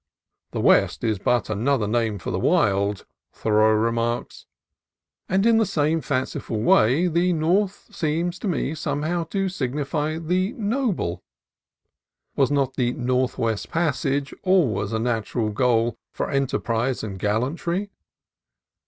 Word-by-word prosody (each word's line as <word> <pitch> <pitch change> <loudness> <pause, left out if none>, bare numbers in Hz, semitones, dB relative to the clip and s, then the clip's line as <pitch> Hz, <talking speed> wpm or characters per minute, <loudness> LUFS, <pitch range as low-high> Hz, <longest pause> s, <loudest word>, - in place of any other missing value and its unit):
"The - - -3
West - - +3
is 110 -4 0
but 120 +3 +1
another 110 +2 0
name 110 -1 0
for 90 - -5
the - - -1
Wild," 100 0 +1 0.3
Thoreau 110 0 +3
remarks; 115 +2 -1 0.8
and 195 +2 +2
in 230 -1 +5
the - - +4
same 160 -2 +1
fanciful 130 -5 -2
way 120 +8 +4
the 175 +1 +2
North 185 +5 0
seems 170 +3 -1
to - - -4
me 160 -4 -1
somehow 160 +3 -2
to 195 +3 -1
signify 150 0 -2
the 180 +5 0
Noble. 210 - -1 1.1
Was 135 -2 +3
not 135 -2 0
the 120 -1 +1
Northwest 125 -3 -1
Passage 140 -3 -1
always 145 - +2
a 110 - 0
natural 115 -1 -1
goal 115 0 +1
for - - -4
enterprise 130 -2 -1
and 100 -3 -5
gallantry? 160 - -1
135 Hz, 125 wpm, -23 LUFS, 115-170 Hz, 1.1 s, in